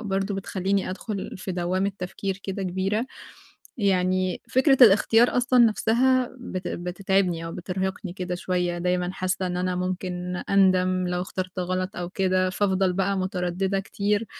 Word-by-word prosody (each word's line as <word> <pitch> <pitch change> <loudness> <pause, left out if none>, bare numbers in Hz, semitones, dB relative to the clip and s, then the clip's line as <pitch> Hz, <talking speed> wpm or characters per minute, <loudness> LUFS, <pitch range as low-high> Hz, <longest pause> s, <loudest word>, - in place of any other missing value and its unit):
برضه، 195 -2 -2
بتخلِّيني 195 0 -1
أدخل 200 +1 -5
في 185 0 -5
دوامة 185 +3 -1
تفكير 190 +2 -4
كده 195 0 -4
كبيرة. 190 +6 -1 0.7
يعني، 185 -3 +1
فكرة 270 +1 +4
الاختيار 225 +3 +5
أصلًا 250 0 +3
نفسها، 245 +3 +2
بت 185 -7 -5
بتتعبني 180 -1 -1
أو 165 - -5
بترهقني 190 +1 -4
كده 180 -1 -4
شوية، 180 -1 -1
دايمًا 180 +1 0
حاسَّة 185 0 -2
إن 180 0 -3
أنا 180 0 -1
ممكن 180 0 -3
أندم 185 -2 +3
لو 180 0 -1
اخترت 185 0 -5
غلط 185 +2 -2
أو 175 -1 -4
كده، 185 -1 +1
فافضل 190 -1 +1
بقى 195 +1 0
مترددة 185 +1 -1
كتير. 205 +2 -1
185 Hz, 140 wpm, -25 LUFS, 180-200 Hz, 0.7 s, الاختيار